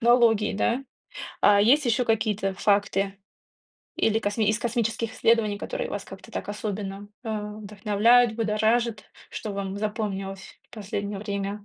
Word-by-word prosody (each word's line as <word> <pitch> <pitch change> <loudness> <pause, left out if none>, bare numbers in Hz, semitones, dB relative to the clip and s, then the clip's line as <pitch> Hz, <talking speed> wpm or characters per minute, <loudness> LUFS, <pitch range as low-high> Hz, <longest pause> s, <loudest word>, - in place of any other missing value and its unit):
технологий, 235 -4 +4
да. 245 +6 0 0.6
А 205 -1 +6
есть 270 +7 +5
ещё 240 +2 +2
какие-то 215 -3 0
факты 200 0 +1 0.8
или 220 0 +2
косми 205 0 0
из 215 +1 +2
космических 230 -1 -1
исследований, 220 -3 +2
которые - - -4
вас - - -4
как-то - - -12
так - - -5
особенно, 205 -1 -5 0.2
э, - - -5
вдохновляют, 215 +2 +2
будоражат, 220 +1 +1 0.3
что 215 -2 -5
вам 195 0 -4
запомнилось 200 -2 -4
в - - -13
последнее 205 -1 -4
время? 200 0 -4
210 Hz, 135 wpm, -26 LUFS, 200-230 Hz, 0.8 s, А